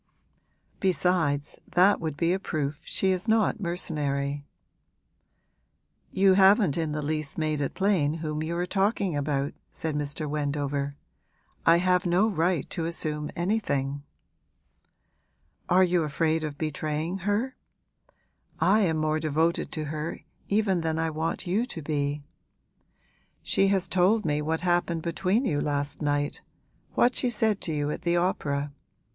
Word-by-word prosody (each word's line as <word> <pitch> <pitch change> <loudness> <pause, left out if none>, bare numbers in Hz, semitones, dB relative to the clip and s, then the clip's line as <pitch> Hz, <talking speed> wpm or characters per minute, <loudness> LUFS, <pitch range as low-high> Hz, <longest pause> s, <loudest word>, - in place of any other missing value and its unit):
Besides, 170 -5 +1
that 185 +3 +4
would 155 -3 -4
be 170 +2 +2
a 190 - -1
proof 150 -5 -3
she 190 - +1
is 185 +3 -2
not 220 0 +2
mercenary.' 145 -6 -2 1.6
'You 190 0 +4
haven't 195 - +5
in 160 -2 -1
the 150 0 -3
least 155 -1 -3
made 155 -2 0
it 140 - -2
plain 185 -7 +2
whom 155 -2 -3
you 165 +2 -2
are 175 - 0
talking 195 -2 0
about,' 140 -1 -1 0.2
said 160 -2 -4
Mr. 150 +1 -3
Wendover. 145 -1 -2 0.7
'I 165 +1 +7
have 180 +1 +2
no 180 +5 +3
right 175 -5 0
to 165 - -2
assume 150 -3 -2
anything.' 145 -8 -1 1.7
'Are 185 +1 +5
you 180 -1 +2
afraid 160 +1 0
of 150 -2 -4
betraying 155 +3 -2
her? 205 +7 -1 1.0
I 210 +3 +4
am 170 -6 +2
more 155 0 +1
devoted 160 +2 0
to 155 - -3
her 155 +2 -4 0.3
even 200 -4 +1
than 160 -1 -1
I 160 0 0
want 160 +4 -3
you 190 +6 +1
to 165 - -7
be. 145 -1 -2 1.2
She 195 - +2
has 195 -1 +1
told 195 +4 +2
me 150 -1 +1
what 160 +2 -1
happened 175 -2 0
between 190 +8 0
you 145 -9 0
last 145 0 -2
night 145 -1 -1 0.5
what 245 +1 +3
she 250 - +1
said 220 -3 +1
to 165 - -2
you 145 -1 -1
at - - -5
the 175 0 +1
opera. 145 -5 -1
160 Hz, 145 wpm, -27 LUFS, 150-185 Hz, 1.7 s, I